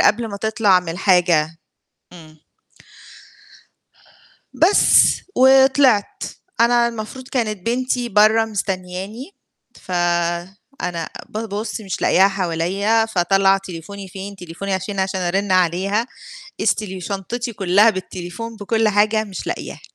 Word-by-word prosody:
قبل 230 Hz, +1 st, +2 dB
ما 200 Hz, -, -6 dB
تطلع 210 Hz, -3 st, +2 dB
من 180 Hz, -, -10 dB
الحاجة. 170 Hz, -3 st, +2 dB, 0.6 s
امم. 155 Hz, -2 st, -15 dB, 2.2 s
بس، 365 Hz, +5 st, +4 dB, 0.2 s
وطلعت. 265 Hz, -4 st, +4 dB, 0.4 s
أنا 235 Hz, 0 st, +4 dB
المفروض 235 Hz, +3 st, -8 dB
كانت 215 Hz, -6 st, -3 dB
بنتي 250 Hz, 0 st, -1 dB
برّا 215 Hz, +1 st, +4 dB
مستنّياني، 195 Hz, -, -5 dB, 0.5 s
فأنا 175 Hz, -, -3 dB, 0.2 s
بابُص 215 Hz, 0 st, -5 dB
مش 195 Hz, -3 st, -5 dB
لاقياها 190 Hz, +2 st, +5 dB
حواليَّ، 195 Hz, +4 st, 0 dB
فاطلّع 195 Hz, +2 st, +3 dB
تليفوني 190 Hz, +1 st, -9 dB
فين؟ 195 Hz, +2 st, -8 dB
تليفوني 180 Hz, +2 st, -6 dB
عشان 195 Hz, +1 st, -4 dB
عشان 190 Hz, 0 st, -2 dB
أرنّ 190 Hz, +2 st, -1 dB
عليها 185 Hz, +6 st, +1 dB, 0.5 s
إذ -, -, +3 dB
تلي 190 Hz, -3 st, -6 dB
شنطتي 220 Hz, +6 st, -4 dB
كُلّها 200 Hz, +3 st, +4 dB
بالتليفون 185 Hz, +4 st, -7 dB
بكل 220 Hz, +1 st, 0 dB
حاجة 215 Hz, +1 st, +2 dB
مش 195 Hz, -3 st, -8 dB
لاقياها. -, -, -5 dB
200 Hz, 110 wpm, -20 LUFS, 180-225 Hz, 2.2 s, لاقياها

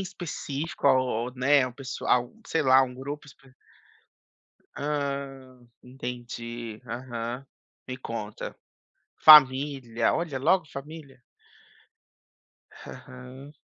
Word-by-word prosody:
específico 165 Hz, -5 st, -4 dB
o 130 Hz, -2 st, +6 dB, 0.3 s
ou, 125 Hz, -, -8 dB
né, 130 Hz, +1 st, +4 dB
um 125 Hz, -, -7 dB
pessoal, 125 Hz, -2 st, -1 dB
sei 160 Hz, -, 0 dB
lá, 130 Hz, -1 st, +6 dB
um 125 Hz, -1 st, -4 dB
grupo 140 Hz, +3 st, -7 dB
espe 135 Hz, -2 st, -18 dB, 1.2 s
Hã. 140 Hz, -3 st, -4 dB, 0.2 s
Entendi, 120 Hz, -3 st, -7 dB
aham. 120 Hz, +2 st, -5 dB, 0.4 s
Me 130 Hz, 0 st, -5 dB
conta. 115 Hz, -4 st, -6 dB, 0.7 s
Família, 135 Hz, -5 st, +6 dB
olha, 165 Hz, -5 st, -2 dB
logo 180 Hz, +5 st, +3 dB
família. 140 Hz, -1 st, -10 dB, 1.5 s
Aham. 130 Hz, +3 st, -11 dB
130 Hz, 90 wpm, -27 LUFS, 125-145 Hz, 1.5 s, o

